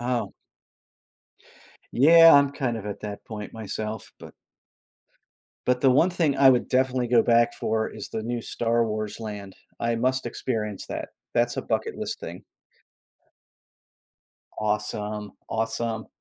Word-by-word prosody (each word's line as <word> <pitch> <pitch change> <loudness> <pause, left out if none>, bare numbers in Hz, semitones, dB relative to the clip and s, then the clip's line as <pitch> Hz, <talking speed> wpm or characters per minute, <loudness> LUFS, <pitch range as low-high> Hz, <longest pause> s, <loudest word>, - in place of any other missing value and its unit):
Oh. 120 -1 -2 1.6
Yeah, 165 +5 +8
I'm 140 -1 +6
kind 130 -4 -2
of 105 - -8
at 100 - -5
that 105 -1 -6
point 105 -2 -7
myself, 110 0 -5
but - - -12 1.3
but 125 0 +2
the 135 - +5
one 160 +8 +4
thing 160 -6 +1
I 135 -1 +7
would 125 -2 +1
definitely 130 -1 +1
go 120 -1 +5
back 120 0 +3
for 110 0 -1
is - - -8
the 110 - -4
new 120 +1 -3
Star 115 0 0
Wars 110 0 -4
land. 105 -3 -7 0.2
I 115 0 0
must 130 +2 0
experience 110 -4 -3
that. - - -5 0.2
That's 120 +1 +1
a - - -2
bucket-list 450 - -3
thing. - - -8 2.2
Awesome. 105 -1 -2 0.2
Awesome. 115 0 -2
115 Hz, 135 wpm, -25 LUFS, 110-125 Hz, 2.2 s, Yeah